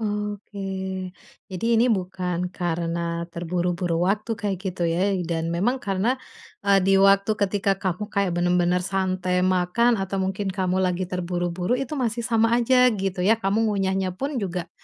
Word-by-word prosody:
Oh, 210 -1 -2
oke. 200 0 -11 0.9
Jadi 185 +3 -5
ini 235 +2 +4
bukan 180 -3 -1
karena 170 -1 -2
terburu-buru 175 0 -1
waktu 210 +4 0
kayak 205 -2 -2
gitu, 185 -3 -3
ya. 185 +4 +1
Dan 165 0 -2
memang 210 +10 0
karena, 210 +7 0 0.4
eee, 200 -1 +4
di 195 0 +4
waktu 195 +1 +5
ketika 200 -1 0
kamu 185 +2 -2
kayak 195 -4 0
bener-bener 175 0 +2
santai 185 -1 0
makan, 185 +6 +2
atau 195 -1 -2
mungkin 190 +1 -2
kamu 185 -1 0
lagi 180 0 -1
terburu-buru. 180 +1 -2
Itu 270 +3 -4
masih 235 -3 -1
sama 230 -1 +2
aja, 250 0 +4
gitu, 190 -3 -2
ya. 225 +2 +3
Kamu 205 +3 +1
ngunyahnya 190 -2 0
pun 275 +9 -4
juga 185 -6 -3
190 Hz, 155 wpm, -24 LUFS, 180-210 Hz, 0.9 s, waktu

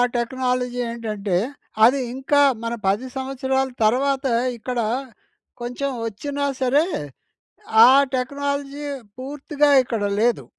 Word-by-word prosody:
Technology 250 0 -1
ఏంటంటే 210 -5 -3 0.5
అది 265 +3 +4
ఇంకా 280 +2 +2 0.2
మన 230 0 -2
10 210 +7 +1
సంవత్సరాల 265 0 -1
తర్వాత 265 +5 +2 0.3
ఇక్కడ 245 +1 -4 0.8
కొంచెం 250 +3 -3 0.2
వచ్చినా 285 +7 -3 0.2
సరే 280 +5 +3 1.0
ఆ - - +8 0.3
టెక్నాలజీ 280 +2 -3 0.3
పూర్తిగా 290 +2 0
ఇక్కడ 230 -4 -3 0.2
లేదు. 235 0 +1
260 Hz, 95 wpm, -22 LUFS, 240-280 Hz, 1.0 s, ఆ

